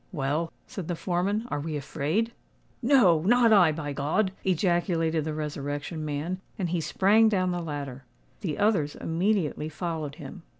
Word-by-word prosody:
"Well," 155 +1 -1
said 185 -5 -7
the 175 - -1
foreman, 190 +6 -1
"are - - -2
we 150 +1 -3
afraid?" 155 - -1 0.5
"No—not 230 - +5
I, 180 -6 +6
by 150 -2 -4
God!" 155 +8 0
ejaculated 170 -3 +1
the 155 - -2
Resurrection 150 +1 -4
Man; 155 +5 -3 0.2
and 180 -4 -1
he 175 -1 0
sprang 210 +7 +4
down 185 -3 +1
the 175 0 -2
ladder. 140 -5 -6 0.3
The 170 -8 -3
others 200 -9 +2
immediately 165 -3 0
followed 160 -3 -4
him. 185 +4 -9
165 Hz, 145 wpm, -27 LUFS, 150-190 Hz, 0.5 s, I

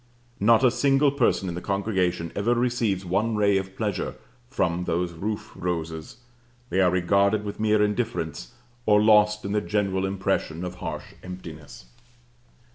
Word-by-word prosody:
Not 115 +4 +5
a 125 - +6
single 140 +2 +3
person 125 -8 +1
in 90 - -3
the 90 - -5
congregation 95 -4 -1
ever 115 +4 +1
receives 120 -6 0
one 105 +6 0
ray 100 -2 +3
of 95 0 -8
pleasure 105 -5 -2 0.3
from 90 -7 -1
those 85 +1 -1
roof 105 +6 -4
roses; 80 0 -4 0.5
they 95 - +2
are 90 - +5
regarded 100 +4 +2
with 100 - -6
mere 105 -1 +3
indifference, 85 - -2 0.3
or 105 -1 +6
lost 105 -1 +4
in 100 - -3
the 105 0 +1
general 100 -2 0
impression 90 -3 -2
of 90 0 -6
harsh - - -6
emptiness. 80 -8 -10
100 Hz, 150 wpm, -25 LUFS, 90-110 Hz, 0.5 s, a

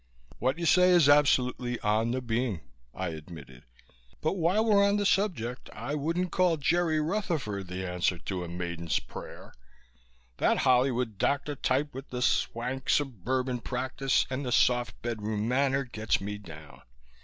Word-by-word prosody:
"What 130 +4 0
you 170 - -3
say 180 +2 +5
is 175 -5 +6
absolutely 125 -4 +3
on 110 +2 +1
the 130 +1 -2
beam," 115 -6 -1 0.3
I 95 +5 -4
admitted. 75 -6 -10 0.5
"But 160 - 0
while 190 +4 +2
we're 205 -3 +5
on 200 +1 +3
the 205 - 0
subject 165 - 0
I 145 - -5
wouldn't 165 +5 -1
call 180 -3 +2
Jerry 160 +1 +1
Rutherford 155 - -2
the 90 +1 -4
answer 90 0 0
to 90 +2 -4
a - - -6
maiden's 85 -1 -2
prayer. - - -10 0.8
That - - +2
Hollywood 125 -4 +2
doctor 145 +1 0
type 140 +3 0
with 135 +2 -8
the 125 0 -3
swank 130 +3 -1
suburban 130 - 0
practice 130 +2 0
and 130 +2 -2
the 125 - -3
soft 120 0 +2
bedroom 110 -2 -2
manner 135 +2 +2
gets 110 -3 -1
me 105 +1 -5
down. 80 -6 -12
125 Hz, 155 wpm, -29 LUFS, 105-150 Hz, 0.8 s, is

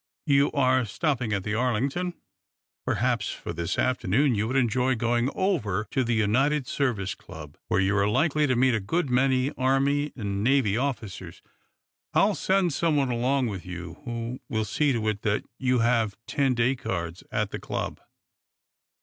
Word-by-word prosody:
You 140 -2 +3
are 130 -2 +3
stopping 125 - -1
at 100 -2 -1
the 105 - -2
Arlington? 130 +10 0 0.7
Perhaps, - - 0
for - - -6
this 85 +2 -3
afternoon, 130 +2 +2
you 105 0 0
would 130 - -2
enjoy 130 +1 +2
going 120 +2 +1
over 110 - 0
to 130 - +1
the 120 -1 0
United 130 +7 +2
Service 120 -9 -1
Club, 75 -3 -11
where - - +1
you 95 +1 +2
are 100 0 +2
likely 150 +5 +2
to 130 - +2
meet 130 +1 +3
a 110 - +1
good 140 - -1
many 130 +1 +2
Army 135 +3 +1
and 100 -4 -3
Navy 125 -5 +3
officers. 120 -7 -4 0.7
I - - +6
will 210 - +2
send 190 -4 +1
some 165 +1 +1
one 135 -3 +1
along 125 +3 +1
with 100 -6 -4
you 85 -2 -8
who 120 +1 -4
will 110 -4 -1
see 140 +8 +1
to 115 -4 -1
it 105 -1 -1
that 105 -1 0 0.2
you 130 -2 +2
have 115 -5 +1
ten 135 -3 +1
day 120 +3 +2
cards 85 -6 -4
at 105 -1 -1
the - - -4
club." - - -4
125 Hz, 175 wpm, -26 LUFS, 105-135 Hz, 0.7 s, I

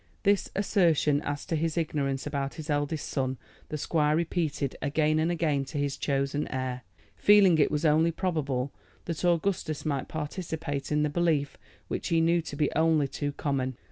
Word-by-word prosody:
This 200 -1 +2
assertion 165 -7 +2
as 145 -1 -4
to 165 - -1
his 160 +1 -1
ignorance 140 -4 -1
about 140 -2 -3
his 155 -1 -5
eldest 145 +1 -1
son 130 -2 -1 0.3
the 155 - -3
squire 150 0 +1
repeated 160 -4 -1
again 155 +1 +1
and 160 +2 +1
again 155 -5 +1
to 145 +3 -6
his 140 -1 -1
chosen 140 +1 -1
heir, 130 -1 -3 0.3
feeling 200 -5 +6
it 145 - +4
was 150 +2 -1
only 160 +2 +4
probable 145 -7 -2 0.3
that 165 -1 -4
Augustus 170 -3 0
might 140 -3 -1
participate 155 -2 -4
in 150 0 +2
the 150 - +1
belief 155 -3 +1 0.3
which - - -3
he 165 - +2
knew 170 +1 +3
to 155 - -7
be 150 0 +1
only 160 -2 +3
too 145 +1 -3
common. 130 -3 -2
150 Hz, 170 wpm, -28 LUFS, 140-165 Hz, 0.3 s, feeling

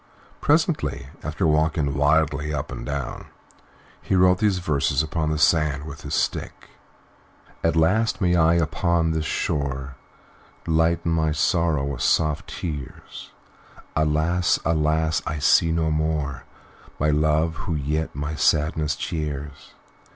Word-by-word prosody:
Presently, 150 - +1
after 80 +4 -2
walking 75 -2 +1
wildly 75 +1 +1
up 75 -3 -4
and - - -6
down, 70 0 -5 0.7
he - - -1
wrote 90 0 +4
these 105 -3 +2
verses 75 -3 0
upon 80 0 -2
the 80 - -1
sand 75 -2 +2
with 70 -2 -9
his - - -3
stick: - - -3 0.9
"At 80 - +2
last 105 +8 +2
may 90 -2 +2
I 85 0 +4
upon 85 +1 +1
this 80 -1 -1
shore 70 -2 -2 0.7
Lighten 85 +1 +1
my 80 -1 +1
sorrow 80 -1 +1
with 70 0 -4
soft 75 -2 +1
tears. 75 -6 -7 0.7
Alas! 80 +3 +2
alas! 80 0 +1
I 80 - -2
see 80 +3 +4
no 80 -1 0
more 75 -3 -2 0.5
My 75 +1 +2
Love, 75 +2 +2
who 85 - -1
yet 75 +2 -2
my 70 +2 -3
sadness 75 0 +1
cheers. 75 -2 -5
80 Hz, 130 wpm, -23 LUFS, 75-80 Hz, 0.9 s, wrote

